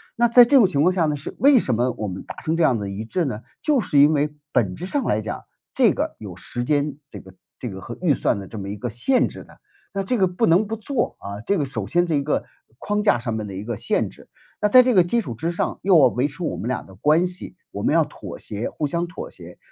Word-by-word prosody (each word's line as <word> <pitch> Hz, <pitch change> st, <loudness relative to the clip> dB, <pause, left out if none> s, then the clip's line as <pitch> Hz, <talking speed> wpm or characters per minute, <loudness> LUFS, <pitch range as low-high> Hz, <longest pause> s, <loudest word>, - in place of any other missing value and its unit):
那 240 Hz, +1 st, +3 dB
在 240 Hz, +1 st, +8 dB
这 270 Hz, +3 st, +5 dB
种 230 Hz, -, +7 dB
情 160 Hz, -7 st, +1 dB
况 180 Hz, +4 st, +4 dB
下 175 Hz, -3 st, +1 dB
呢， 150 Hz, -, 0 dB
是 140 Hz, -, -7 dB
为 275 Hz, -1 st, +6 dB
什 125 Hz, -, 0 dB
么 125 Hz, +2 st, +1 dB
我 105 Hz, -, -2 dB
们 95 Hz, 0 st, -6 dB
达 -, -, -7 dB
成 160 Hz, +1 st, -2 dB
这 170 Hz, -, +2 dB
样 130 Hz, -, +4 dB
的 100 Hz, -, -4 dB
一 100 Hz, +3 st, -5 dB
致 175 Hz, +9 st, -1 dB
呢？ 120 Hz, -5 st, -4 dB, 0.2 s
就 295 Hz, -4 st, +2 dB
是 145 Hz, -9 st, +2 dB
因 145 Hz, +2 st, +6 dB
为 150 Hz, 0 st, 0 dB, 0.2 s
本 95 Hz, -9 st, +1 dB
质 180 Hz, -, -6 dB
上 275 Hz, +4 st, -1 dB
来 110 Hz, -, 0 dB
讲， 105 Hz, -, -6 dB, 0.3 s
这 -, -, +5 dB
个 -, -, -3 dB
有 100 Hz, -5 st, -9 dB
时 120 Hz, +6 st, -5 dB
间 145 Hz, +1 st, 0 dB
这 -, -, -8 dB
个 95 Hz, -, -14 dB, 0.3 s
这 125 Hz, -, -4 dB
个 95 Hz, -1 st, -8 dB
和 120 Hz, -, -7 dB
预 165 Hz, -6 st, +3 dB
算 -, -, 0 dB
的 95 Hz, -, -8 dB
这 110 Hz, -, -9 dB
么 100 Hz, -1 st, -5 dB
一 100 Hz, -, -4 dB
个 125 Hz, +4 st, -4 dB
限 235 Hz, -, +2 dB
制 -, -, -10 dB
的。 -, -, -19 dB, 0.3 s
那 195 Hz, 0 st, -1 dB
这 245 Hz, +5 st, 0 dB
个 190 Hz, -, +3 dB
不 180 Hz, +5 st, 0 dB
能 185 Hz, +6 st, +3 dB
不 225 Hz, -, -3 dB
做， 230 Hz, +3 st, -2 dB
啊， 100 Hz, +1 st, -6 dB
这 200 Hz, -, +1 dB
个 150 Hz, -, 0 dB
首 135 Hz, -, -4 dB
先 175 Hz, +1 st, +2 dB
是 160 Hz, -4 st, 0 dB
一 -, -, +1 dB
个 145 Hz, -, -1 dB, 0.4 s
框 205 Hz, 0 st, -1 dB
架 205 Hz, -, +3 dB
上 115 Hz, -1 st, -4 dB
面 110 Hz, -1 st, -4 dB
的 95 Hz, -, -7 dB
一 95 Hz, -, -5 dB
个 115 Hz, 0 st, -4 dB
限 -, -, 0 dB
制。 -, -, -17 dB, 0.3 s
那 210 Hz, -, +2 dB
在 255 Hz, +4 st, +8 dB
这 250 Hz, -1 st, +2 dB
个 185 Hz, -, +6 dB
基 235 Hz, +6 st, +1 dB
础 120 Hz, -, -6 dB
之 165 Hz, +9 st, -3 dB
上 -, -, -2 dB
又 190 Hz, -3 st, +5 dB
要 130 Hz, -, +7 dB
维 125 Hz, +3 st, 0 dB
持 150 Hz, +5 st, -8 dB
我 -, -, -2 dB
们 115 Hz, -, -5 dB
俩 125 Hz, -, -2 dB
的 95 Hz, -, -15 dB
关 155 Hz, -, +3 dB
系， 180 Hz, 0 st, -6 dB, 0.2 s
我 -, -, -5 dB
们 -, -, +1 dB
要 -, -, +5 dB
妥 -, -, -9 dB
协、 105 Hz, +3 st, -5 dB
互 150 Hz, -, -3 dB
相 170 Hz, +3 st, -2 dB
妥 170 Hz, -, -8 dB
协。 90 Hz, -1 st, -13 dB
150 Hz, 310 characters per minute, -22 LUFS, 115-190 Hz, 0.4 s, 在